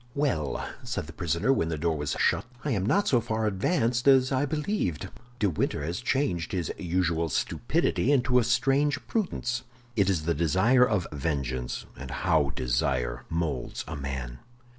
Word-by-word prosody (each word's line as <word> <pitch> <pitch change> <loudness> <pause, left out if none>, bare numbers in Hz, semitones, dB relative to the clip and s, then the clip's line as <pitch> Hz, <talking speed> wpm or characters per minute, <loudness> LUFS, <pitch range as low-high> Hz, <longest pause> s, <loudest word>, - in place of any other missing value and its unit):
"Well," 135 - -1
said - - -3
the 85 - -10
prisoner, 85 - +1
when 80 -10 0
the 80 - -2
door 80 +1 0
was 75 -1 -2
shut, - - +2 0.2
"I 145 - 0
am 100 -6 0
not 200 - +2
so 120 -3 +3
far 110 0 -1
advanced 120 - +1
as 130 -1 +6
I 135 +2 +1
believed. 150 - -2 0.3
De 105 - +2
Winter 75 -4 -1
has 85 +8 -3
changed 120 - 0
his 90 -5 -1
usual 85 -2 0
stupidity 120 - 0
into 125 -2 +4
a - - +2
strange 135 +5 +2
prudence. 130 - -1 0.3
It 100 -3 +3
is 85 -5 +1
the 85 - +2
desire 95 - +4
of 100 -6 +1
vengeance, 70 -4 -2
and 65 0 -8
how 70 - +1
desire 60 -1 -1
molds 80 -7 -2
a 80 - -5
man! 65 -3 -5
90 Hz, 165 wpm, -27 LUFS, 75-125 Hz, 0.3 s, as